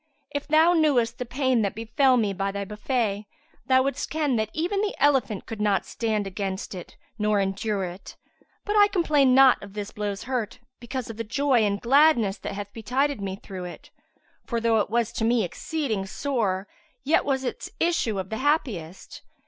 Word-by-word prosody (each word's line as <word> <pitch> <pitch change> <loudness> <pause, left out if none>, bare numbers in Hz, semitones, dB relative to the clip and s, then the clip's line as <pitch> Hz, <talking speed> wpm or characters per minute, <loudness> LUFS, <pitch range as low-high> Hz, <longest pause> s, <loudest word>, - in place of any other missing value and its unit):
If 285 0 -4
thou 315 +3 +5
knewest 260 -8 +2
the 250 - -4
pain 260 -1 +1
that 200 0 -1
befel 245 +4 +2
me 210 -4 +1
by 195 +1 -2
thy 200 0 -4
buffet, 210 0 -2 0.4
thou 260 0 +5
wouldst 275 +1 -2
ken 300 -4 0
that 220 -1 -1
even 360 +6 -1
the 420 -1 -1
elephant 265 -8 +2
could 220 -2 -6
not 205 -2 +1
stand 220 -3 -2
against 195 0 -4
it 180 -2 -9 0.2
nor 210 -1 +2
endure 195 +1 -1
it: 180 +1 -8 0.5
but 415 - -1
I 410 -1 +7
complain 300 -9 +3
not 265 -1 +6
of 200 -1 -11
this 205 -1 -5
blow's 205 -1 -4
hurt, 245 -2 -3 0.2
because 245 0 -5
of 220 - -11
the 230 - -3
joy 265 +3 +2
and 200 -1 +1
gladness 240 -6 +4
that - - -5
hath 205 0 -7
betided 255 +3 -1
me 190 -1 -3
through 190 -2 -8
it; 175 - -10 0.5
for 235 - -2
though 230 -1 +2
it 205 - -1
was 235 0 0
to - - -3
me 230 0 +3
exceeding 215 - -3
sore 210 -6 -1 0.4
yet 300 +4 +3
was 270 -2 -1
its 250 - -4
issue 330 - +1
of 190 +1 -5
the 220 - -2
happiest. 225 - -2
230 Hz, 190 wpm, -25 LUFS, 200-275 Hz, 0.5 s, I